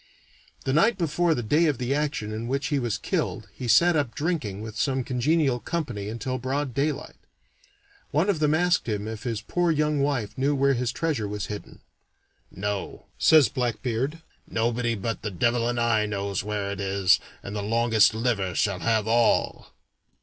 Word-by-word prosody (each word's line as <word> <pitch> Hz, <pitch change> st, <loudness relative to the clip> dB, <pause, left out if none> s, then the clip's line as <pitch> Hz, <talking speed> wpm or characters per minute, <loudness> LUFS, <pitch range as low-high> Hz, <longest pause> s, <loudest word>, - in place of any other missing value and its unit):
The 130 Hz, -, 0 dB
night 200 Hz, +8 st, +4 dB
before 170 Hz, -1 st, +1 dB
the 120 Hz, -, -3 dB
day 150 Hz, +9 st, +3 dB
of 145 Hz, -4 st, +1 dB
the 125 Hz, +2 st, -1 dB
action 145 Hz, -7 st, -2 dB
in 110 Hz, +2 st, -4 dB
which 135 Hz, +2 st, -1 dB
he 145 Hz, -2 st, +1 dB
was 120 Hz, -4 st, -1 dB
killed -, -, -2 dB
he 125 Hz, -, -6 dB
sat 170 Hz, -, +5 dB
up 140 Hz, -7 st, -1 dB
drinking 145 Hz, -, -2 dB
with 110 Hz, -1 st, -7 dB
some 130 Hz, +2 st, 0 dB
congenial 135 Hz, +1 st, +1 dB
company 120 Hz, -11 st, -3 dB
until 130 Hz, +3 st, -3 dB
broad 135 Hz, +1 st, -2 dB
daylight. 145 Hz, +2 st, -2 dB, 0.9 s
One 155 Hz, +6 st, +1 dB
of 195 Hz, -6 st, +1 dB
them 150 Hz, 0 st, +3 dB
asked 175 Hz, -5 st, +2 dB
him 105 Hz, -1 st, -2 dB
if 110 Hz, -1 st, -6 dB
his 115 Hz, -3 st, -3 dB
poor 175 Hz, +5 st, 0 dB
young 150 Hz, -2 st, +1 dB
wife 140 Hz, -7 st, -1 dB
knew 140 Hz, +2 st, +2 dB
where 140 Hz, 0 st, +3 dB
his 125 Hz, -1 st, -1 dB
treasure 140 Hz, -7 st, -1 dB
was 105 Hz, -1 st, -4 dB
hidden. 105 Hz, -, -10 dB, 0.7 s
"No," 100 Hz, +1 st, -4 dB
says 155 Hz, -4 st, +6 dB
Blackbeard; 125 Hz, +4 st, -2 dB, 0.3 s
"nobody 115 Hz, +1 st, 0 dB
but 110 Hz, +2 st, -3 dB
the 105 Hz, -, -3 dB
devil 120 Hz, +5 st, +1 dB
and 120 Hz, 0 st, -1 dB
I 110 Hz, -2 st, +2 dB
knows 100 Hz, -2 st, -2 dB
where 105 Hz, -1 st, -3 dB
it 100 Hz, -, -5 dB
is, 95 Hz, -1 st, +3 dB, 0.2 s
and 100 Hz, -, -6 dB
the 105 Hz, -, -2 dB
longest 115 Hz, 0 st, +3 dB
liver 110 Hz, -6 st, -1 dB
shall 100 Hz, -4 st, +1 dB
have 110 Hz, +4 st, +1 dB
all." 115 Hz, +1 st, +2 dB
120 Hz, 180 wpm, -26 LUFS, 110-145 Hz, 0.9 s, says